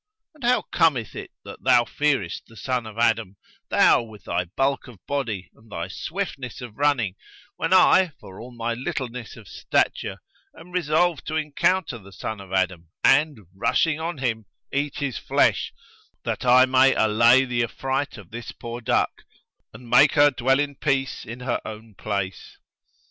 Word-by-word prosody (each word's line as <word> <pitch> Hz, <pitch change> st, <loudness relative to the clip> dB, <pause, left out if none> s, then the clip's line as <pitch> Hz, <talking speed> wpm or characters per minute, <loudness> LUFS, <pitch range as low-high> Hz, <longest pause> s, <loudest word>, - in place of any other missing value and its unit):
And 300 Hz, -4 st, -16 dB
how 245 Hz, +1 st, +3 dB
cometh 130 Hz, -11 st, +1 dB
it -, -, -7 dB, 0.2 s
that -, -, -10 dB
thou 120 Hz, -, +4 dB
fearest 135 Hz, -, -1 dB
the 115 Hz, -, -16 dB
son 125 Hz, +1 st, -2 dB
of 110 Hz, 0 st, -11 dB
Adam, 115 Hz, -4 st, +1 dB, 0.3 s
thou, -, -, +5 dB
with 110 Hz, -3 st, -12 dB
thy 90 Hz, +1 st, -1 dB
bulk 135 Hz, +11 st, -1 dB
of 120 Hz, -4 st, -12 dB
body 115 Hz, -10 st, -3 dB
and 110 Hz, -1 st, -22 dB
thy 85 Hz, 0 st, -4 dB
swiftness 140 Hz, -, -5 dB
of 120 Hz, -5 st, -9 dB
running 140 Hz, -9 st, +1 dB, 0.4 s
when 165 Hz, -, -2 dB
I, 185 Hz, -1 st, +6 dB
for 95 Hz, -8 st, -12 dB
all 120 Hz, -, -9 dB
my 120 Hz, -1 st, -3 dB
littleness 125 Hz, -3 st, -5 dB
of 110 Hz, -4 st, -13 dB
stature -, -, -1 dB, 0.4 s
am 165 Hz, +2 st, -13 dB
resolved 175 Hz, -1 st, +1 dB
to 155 Hz, -, -3 dB
encounter 155 Hz, -1 st, 0 dB
the 100 Hz, -1 st, -15 dB
son 105 Hz, +2 st, -6 dB
of 95 Hz, -1 st, -13 dB
Adam 95 Hz, -3 st, -1 dB
and, 145 Hz, -3 st, +4 dB
rushing 155 Hz, +10 st, +1 dB
on 165 Hz, 0 st, -3 dB
him, 115 Hz, -5 st, -2 dB, 0.3 s
eat 140 Hz, +1 st, -1 dB
his 140 Hz, -4 st, -3 dB
flesh, -, -, +2 dB, 0.5 s
that -, -, -3 dB
I 125 Hz, +1 st, +7 dB
may 130 Hz, +1 st, +4 dB
allay 115 Hz, +4 st, +5 dB
the 125 Hz, -2 st, -1 dB
affright 135 Hz, +3 st, -3 dB
of 100 Hz, -5 st, -13 dB
this 120 Hz, +1 st, -7 dB
poor 120 Hz, +1 st, -7 dB
duck 115 Hz, -, 0 dB, 0.5 s
and 125 Hz, -, -13 dB
make 130 Hz, +5 st, +6 dB
her 145 Hz, -1 st, +6 dB
dwell 130 Hz, +1 st, +2 dB
in 145 Hz, -1 st, -1 dB
peace 135 Hz, -3 st, -1 dB
in 120 Hz, +3 st, -8 dB
her 125 Hz, -1 st, -1 dB
own 110 Hz, 0 st, -9 dB
place? 100 Hz, -2 st, -4 dB
125 Hz, 170 wpm, -24 LUFS, 110-145 Hz, 0.5 s, I